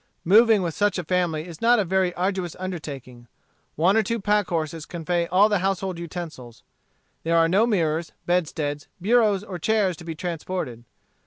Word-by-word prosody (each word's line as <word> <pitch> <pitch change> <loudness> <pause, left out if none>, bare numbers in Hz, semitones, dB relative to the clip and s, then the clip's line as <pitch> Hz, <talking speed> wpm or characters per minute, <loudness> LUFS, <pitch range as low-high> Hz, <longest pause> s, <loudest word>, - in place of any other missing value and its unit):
Moving 215 +2 +5
with 170 -2 -2
such 205 +2 +1
a 180 - -2
family 170 -2 0
is 170 -3 -11
not 240 +1 +5
a 210 - +1
very 185 0 +1
arduous 185 -2 -2
undertaking. 140 -10 -7 0.5
One 180 +6 +3
or 225 - +5
two 230 +3 -2
pack 210 +1 +1
horses 160 -2 -3
convey 170 0 -2
all 190 +5 +5
the 205 -2 +1
household 190 -1 -2
utensils. 160 -9 -8 0.6
There 165 +1 +1
are 165 0 +5
no 200 +7 +3
mirrors, 165 -6 0
bedsteads, 150 -4 -1
bureaus, 210 0 +3
or 185 -4 -7
chairs 205 -1 +1
to - - -11
be 165 -1 -6
transported. 165 -8 -5
180 Hz, 170 wpm, -24 LUFS, 160-195 Hz, 0.6 s, Moving